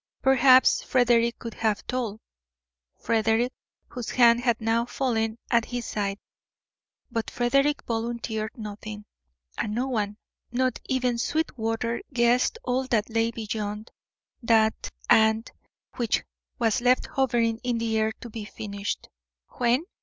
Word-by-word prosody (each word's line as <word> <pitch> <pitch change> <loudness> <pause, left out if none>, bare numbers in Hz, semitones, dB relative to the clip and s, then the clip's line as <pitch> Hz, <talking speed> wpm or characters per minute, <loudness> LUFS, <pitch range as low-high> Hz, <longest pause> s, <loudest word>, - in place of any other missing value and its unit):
Perhaps 260 -1 +6
Frederick 235 -2 +2
could 230 -2 -7
have 215 -2 -1
told, 235 -4 -3 0.8
Frederick, 225 +3 +1 0.4
whose 245 -3 -6
hand 235 -1 +5
had 235 -2 +1
now 225 +1 +1
fallen 230 -3 -1
at 235 -2 +3
his 245 -1 -4
side. 200 -1 -2 0.9
But 230 -1 -2
Frederick 275 +4 +1
volunteered 225 -1 -3
nothing, 210 -1 -7 0.5
and 210 0 -1
no 250 +3 0
one, 210 -4 -1 0.3
not 255 0 0
even 250 -2 0
Sweetwater, 230 -5 -1
guessed 245 - +2
all 255 +1 0
that 225 -2 0
lay 225 0 +2
beyond 215 -1 -5 0.5
that 220 -2 +2 0.2
AND 220 +1 +4 0.5
which 235 -3 +1 0.3
was 235 +1 +1
left 250 +1 +3
hovering 235 -4 +1
in 245 -1 -1
the 230 -1 -1
air 220 0 +1
to 240 - -8
be 220 -1 -6
finished 205 -1 -5 0.5
when? 245 +5 +2
230 Hz, 125 wpm, -26 LUFS, 220-245 Hz, 0.9 s, Perhaps